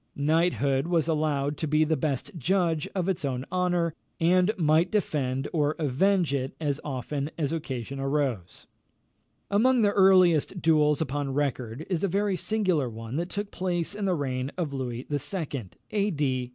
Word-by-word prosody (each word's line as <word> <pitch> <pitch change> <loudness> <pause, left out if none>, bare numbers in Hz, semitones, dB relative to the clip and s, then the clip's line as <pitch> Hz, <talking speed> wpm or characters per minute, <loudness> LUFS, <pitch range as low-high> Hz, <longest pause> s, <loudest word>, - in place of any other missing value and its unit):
Knighthood 145 -2 +1
was 170 -3 +1
allowed 150 -2 0
to 160 - -2
be 155 +1 +3
the 160 +1 +1
best 145 -5 -2
judge 165 0 +1
of 185 -2 -1
its 190 -4 -1
own 130 -2 -2
honour, 180 -3 +1 0.3
and 180 +3 +4
might 160 +1 +3
defend 140 -10 -1
or 150 -2 +1
avenge 165 +3 +2
it 130 -1 -2
as 145 -2 -1
often 140 +1 -3
as 150 -4 -1
occasion 135 -4 -4
arose. 135 -10 -2 0.9
Among 240 +4 +4
the 205 - +4
earliest 185 -3 +4
duels 150 -2 +3
upon 140 -2 -2
record, 130 -1 -2
is 180 -2 -1
a - - +3
very 200 +1 0
singular 185 - 0
one 115 +2 -7
that 175 +2 -2
took 205 +1 -4
place 175 -1 -1
in 205 0 -3
the 185 -2 +2
reign 130 -2 -2
of 160 -6 -2
Louis 125 -3 -3
II. 145 - -3 0.2
(A. 205 -1 +1
D. 150 -6 -1
878). 130 -2 -1
155 Hz, 165 wpm, -27 LUFS, 135-180 Hz, 0.9 s, and